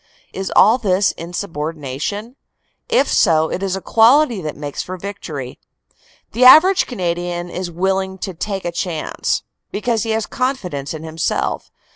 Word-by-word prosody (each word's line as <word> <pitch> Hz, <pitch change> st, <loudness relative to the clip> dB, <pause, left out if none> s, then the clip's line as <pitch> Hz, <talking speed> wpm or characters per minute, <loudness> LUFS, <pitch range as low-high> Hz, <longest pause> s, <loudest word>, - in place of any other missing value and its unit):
Is 190 Hz, 0 st, -4 dB
all 225 Hz, +5 st, +6 dB
this 195 Hz, -3 st, +2 dB
insubordination? 165 Hz, -, -5 dB, 0.5 s
If 475 Hz, +1 st, +3 dB
so 160 Hz, -4 st, +3 dB
it 185 Hz, -, -3 dB
is 195 Hz, -1 st, -1 dB
a 190 Hz, -, -5 dB
quality 235 Hz, +1 st, +4 dB
that 155 Hz, -2 st, -5 dB
makes 145 Hz, -1 st, -5 dB
for 185 Hz, +1 st, -6 dB
victory. 160 Hz, -9 st, -7 dB, 0.7 s
The 240 Hz, +4 st, +1 dB
average 320 Hz, +9 st, +7 dB
Canadian 175 Hz, -4 st, -3 dB
is 180 Hz, 0 st, -4 dB
always 170 Hz, 0 st, -13 dB
willing 190 Hz, 0 st, 0 dB
"to 190 Hz, -, -6 dB
take 195 Hz, +3 st, -4 dB
a 175 Hz, -, -1 dB
chance," 170 Hz, -2 st, -2 dB, 0.3 s
because 225 Hz, +1 st, -1 dB
he 225 Hz, -, -3 dB
has 220 Hz, 0 st, 0 dB
confidence 180 Hz, -, -3 dB
in 155 Hz, -, -8 dB
himself. 160 Hz, 0 st, -2 dB
185 Hz, 150 wpm, -19 LUFS, 165-220 Hz, 0.7 s, average